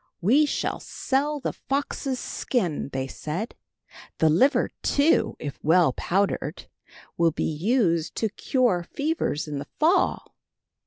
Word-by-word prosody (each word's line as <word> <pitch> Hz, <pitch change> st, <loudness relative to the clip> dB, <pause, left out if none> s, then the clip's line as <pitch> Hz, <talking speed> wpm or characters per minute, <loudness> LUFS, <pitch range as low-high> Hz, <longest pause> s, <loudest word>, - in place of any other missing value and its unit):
"We 265 Hz, -, +4 dB
shall -, -, -2 dB
sell 290 Hz, +3 st, -1 dB
the 255 Hz, -, -3 dB
fox's 275 Hz, -1 st, -2 dB
skin," 180 Hz, -, -2 dB
they 130 Hz, 0 st, -2 dB
said. 155 Hz, -, -5 dB, 0.6 s
"The 160 Hz, -, +4 dB
liver, 260 Hz, -, +3 dB
too, 285 Hz, +3 st, +2 dB
if 145 Hz, -2 st, -6 dB
well 165 Hz, -3 st, +4 dB
powdered, 195 Hz, +8 st, -1 dB, 0.5 s
will 170 Hz, -1 st, +4 dB
be 155 Hz, -, -3 dB
used 170 Hz, -, +1 dB
to 220 Hz, -, 0 dB
cure 235 Hz, -3 st, +1 dB
fevers 280 Hz, -, -2 dB
in 145 Hz, -2 st, -4 dB
the 140 Hz, -, -7 dB
fall." 330 Hz, +5 st, +2 dB
200 Hz, 125 wpm, -25 LUFS, -, 0.6 s, We